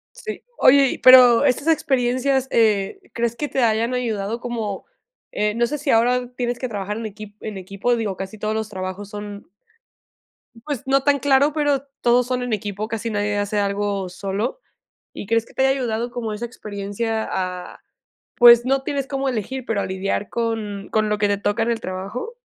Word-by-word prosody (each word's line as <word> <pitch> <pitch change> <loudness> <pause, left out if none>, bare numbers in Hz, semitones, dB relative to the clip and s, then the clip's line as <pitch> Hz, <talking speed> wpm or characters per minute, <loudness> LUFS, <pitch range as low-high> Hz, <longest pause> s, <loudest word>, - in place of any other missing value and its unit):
Sí. 445 -3 -7
Oye, 275 0 +5
pero 255 0 +8
estas 280 +3 +1
experiencias, 265 -3 +1
eh, 210 -4 +2
¿crees 235 0 -1
que 295 - -3
te 265 -3 0
hayan 230 +2 +1
ayudado 225 -3 -2
como? 225 -5 -4 0.5
Eh, 210 0 0
no 235 +2 +1
sé 300 - -3
sí 290 0 -4
ahora 245 +2 +2
tienes 245 -1 -2
que 255 - -4
trabajar 205 -1 -4
en 225 - -5
equipo 210 -1 -9
en 215 -2 -5
equipo, 195 +6 -1
digo, 215 -4 -2
casi 195 +3 -6
todos 215 +1 -2
los 220 -1 -3
trabajos 190 +1 -6
son. 205 -1 -8 1.2
Pues, 285 -6 -4
no 270 0 +2
tan 285 0 +3
claro, 280 +2 +3
pero 290 -3 +1 0.2
todos 245 +1 +3
son 250 0 -1
en 245 -2 -2
equipo, 205 0 -3
casi 225 0 -3
nadie 205 -1 -1
hace 205 +1 -1
algo 200 -1 -1
solo. 200 - -3 0.5
¿Y - - -7
crees 230 +1 +1
que - - -19
te - - -1
haya 270 - +4
ayudado 235 -1 -2
como 235 -3 -4
esa 215 +3 -4
experiencia 220 0 -4
a, 180 -1 -4 0.6
pues, 240 -1 +8
no 270 +1 +1
tienes 275 -1 -2
cómo 275 -1 -1
elegir, 255 +2 -4
pero 220 -4 -1
a - - -2
lidiar 190 +2 -2
con 220 -4 -3
con 215 -1 +1
lo 210 - +1
que 205 0 +2
te 205 0 +1
toca 205 +3 0
en 235 - 0
el 230 - -1
trabajo? 200 - -6
225 Hz, 190 wpm, -22 LUFS, 205-250 Hz, 1.2 s, pero